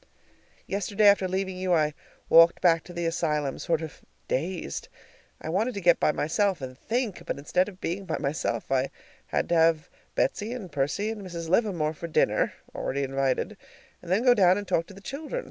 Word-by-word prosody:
Yesterday, 205 +2 0
after 200 -2 +5
leaving 190 0 -2
you, 185 -1 +2
I 155 -2 +2 0.3
walked 165 +1 +7
back 165 -3 +3
to 175 - -10
the 170 0 -3
asylum 150 -4 -1
sort 165 -1 0
of 155 - -8 0.3
dazed. 165 - -3 0.5
I - - -8
wanted 215 +8 0
to - - -2
get 175 -2 +4
by - - +3
myself 185 +5 0
and 130 -2 -7
THINK, 225 - -2
but - - -2
instead 180 +7 +1
of 185 -2 -14
being 190 +4 -3
by - - -2
myself, 140 -6 -2
I 135 0 +2 0.4
had - - -1
to 170 - +2
have 165 -1 +3 0.2
Betsy 215 +4 0
and 205 -9 -7
Percy 145 +10 -1
and 220 -2 -6
Mrs. 170 -3 -6
Livermore 175 -6 +1
for 170 +2 -7
dinner 160 - +2 0.2
(already 140 +1 -2
invited) 135 -1 -1 0.5
and 175 - -8
then 200 +6 +3
go 250 -1 +7
down 185 -4 +5
and 205 -1 -5
talk 165 -1 +1
to - - -12
the 200 - -12
children. 300 - -5
175 Hz, 195 wpm, -27 LUFS, 155-200 Hz, 0.5 s, walked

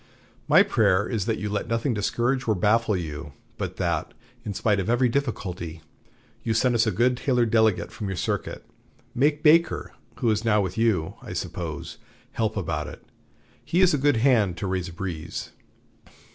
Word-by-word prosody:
My - - +7
prayer 95 +3 +2
is 110 -6 -2
that 110 -1 0
you 105 - -3
let 105 0 -2
nothing 115 +2 0
discourage 120 +5 0
or 110 - +3
baffle 105 +2 +2
you, 75 -3 -6 0.3
but - - -4
that, 85 -4 -2 0.3
in 105 -4 -5
spite 105 -1 +1
of 95 - -2
every 120 +1 +3
difficulty, 90 - -3 0.6
you 115 - -1
send 125 +2 +3
us 115 -1 +2
a - - +2
good 125 +3 +2
Taylor 125 -1 +1
delegate 110 -3 +2
from 105 - -5
your 95 - -3
circuit. - - -3 0.5
Make 145 +4 +1
Baker, 165 +2 +3 0.2
who 120 -4 +1
is 105 +1 0
now 110 -2 +3
with 95 -3 -2
you, 110 -8 +1
I - - -8
suppose, 80 -4 -5 0.3
help 110 -1 -1
about 80 -5 -2
it. - - -10 0.6
He 175 - +1
is 185 -1 +5
a 145 - +1
good 145 -2 +3
hand 110 -8 +3
to 95 - -4
raise 95 -2 -2
a - - -11
breeze." 85 -2 -5
110 Hz, 180 wpm, -25 LUFS, 90-120 Hz, 0.6 s, My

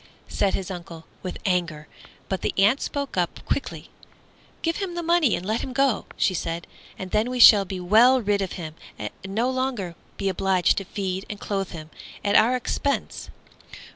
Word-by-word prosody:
said 200 - 0
his 190 0 -4
uncle, 170 -2 -8 0.2
with 185 - -5
anger; 170 -5 -1 0.4
but 190 - -2
the - - -2
aunt 210 +8 +4
spoke 280 -7 -3
up 175 -2 -1
quickly. 280 - -3 0.7
"Give 330 0 0
him 380 -4 -4
the 345 - -3
money 335 -7 +3
and 180 - -6
let 220 +3 0
him 260 - -5
go," 270 -3 +1
she 190 - +2
said, 165 -1 -3 0.3
"and 185 -1 -7
then 215 +3 +1
we 250 0 -3
shall 210 -4 +9
be 190 0 -5
well 225 +8 +5
rid 205 -3 0
of 190 - -3
him 160 -3 -6 0.2
and - - -5
no 205 +6 -1
longer 255 -9 -2 0.2
be 195 - -2
obliged 190 -1 +2
to 195 - -7
feed 190 0 -4
and 205 - -6
clothe 195 -2 -2
him 155 -2 -9 0.3
at 200 - +2
our 235 +4 +5
expense." 275 +3 -2
200 Hz, 185 wpm, -24 LUFS, 185-250 Hz, 0.7 s, shall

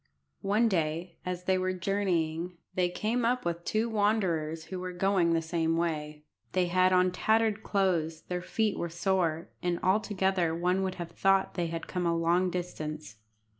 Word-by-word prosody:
One 210 +4 +3
day 170 -2 -1
as 180 0 -3
they 185 0 +2
were 185 0 0
journeying, 180 -3 -1 0.2
they 180 -1 +1
came 220 +7 -1
up 245 -1 +1
with 170 0 -2
two 220 +5 0
wanderers 190 -8 0
who 185 +3 -6
were 180 0 -5
going 180 -2 +2
the 165 0 +1
same 165 0 0
way. 150 -3 -2 0.3
They 185 -1 +3
had 185 +1 +4
on 185 0 +4
tattered 220 +2 +2
clothes, 175 -7 0
their 180 0 -3
feet 215 +3 -1
were 170 - -2
sore, 170 -2 0
and 175 -1 0
altogether 190 -4 +1
one 180 +3 +1
would 190 -1 -2
have 170 -2 -6
thought 195 +2 +2
they 175 -2 -1
had 165 0 -4
come 180 -2 -2
a 170 0 +1
long 175 +2 +2
distance. 155 - -5
180 Hz, 170 wpm, -29 LUFS, 165-195 Hz, 0.3 s, had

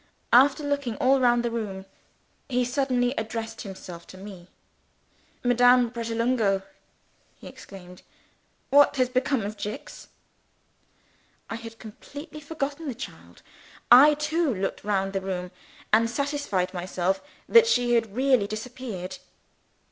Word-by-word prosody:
After 270 +4 +6
looking 285 -5 -2
all 265 +4 +3
round 240 -1 +3
the 235 - -1
room, 200 -5 -4 0.6
he 250 -1 +1
suddenly 250 -1 0
addressed 225 0 -5
himself 185 -3 -9
to 185 - -12
me. 190 -3 -11 1.0
"Madame 245 0 +4
Pratolungo!" 230 -3 0 0.7
he - - -15
exclaimed. 180 -2 -12 0.7
"What 285 +1 +6
has 255 -2 +1
become 255 0 0
of 205 +1 -5
Jicks?" 210 +1 -7 1.4
I - - -2
had 230 0 -9
completely 285 +9 -10
forgotten 295 +1 -4
the 260 - -3
child. 270 - -10 0.5
I 285 +5 +9
too 305 +1 0
looked 195 -3 -3
round 195 -1 -1
the 195 - -1
room, 180 -2 -4 0.4
and 230 +1 +5
satisfied 260 -9 -2
myself 185 +1 -1 0.3
that 465 0 +7
she 245 - +2
had 225 -3 +1
really 255 -5 +3
disappeared. 220 -1 -6
235 Hz, 125 wpm, -26 LUFS, 200-270 Hz, 1.4 s, I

